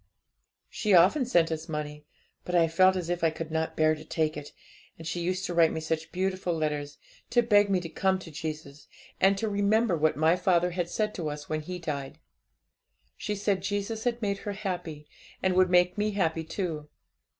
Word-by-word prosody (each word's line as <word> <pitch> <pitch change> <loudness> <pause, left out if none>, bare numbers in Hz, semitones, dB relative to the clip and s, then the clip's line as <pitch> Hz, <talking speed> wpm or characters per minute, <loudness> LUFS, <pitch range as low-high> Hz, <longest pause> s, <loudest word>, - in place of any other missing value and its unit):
'She 210 -3 +1
often 195 - +5
sent 170 -8 +3
us 160 +1 -4
money; 150 -1 -5 0.4
but 180 - -3
I 170 -1 +5
felt 185 +3 +4
as 180 -3 -3
if 175 -1 -2
I 165 - +5
could 160 0 -6
not 160 0 -2
bear 155 0 +4
to 155 0 -8
take 155 0 -1
it. 145 -1 -8 0.5
And 165 - -10
she 170 +2 -3
used 185 +2 -1
to 175 - -3
write 165 -1 +5
me - - -3
such 160 0 -3
beautiful 185 -1 -1
letters 150 -2 -2 0.3
to 240 0 +3
beg 205 -3 +4
me 190 -2 +2
to 170 - -5
come 190 +3 +1
to 180 -3 -10
Jesus, 150 -2 -7 0.3
and 195 +1 +4
to 220 - -1
remember 205 0 +2
what 155 -1 +1
my 160 +3 +4
father 180 -2 +2
had 175 -1 -2
said 215 +2 -1
to 160 -4 -3
us 150 0 -7
when 155 0 -1
he 180 +4 -6
died. 150 -4 -5 1.0
She 210 - -3
said 200 -1 0
Jesus 205 +3 -3
had 240 -1 -1
made 200 -1 -1
her 205 - -4
happy, 175 -7 -5 0.4
and 190 -1 +2
would 185 0 +4
make 180 +2 +3
me 210 +1 +1
happy 165 -4 0
too. 160 -4 -4
175 Hz, 205 wpm, -28 LUFS, 155-195 Hz, 1.0 s, often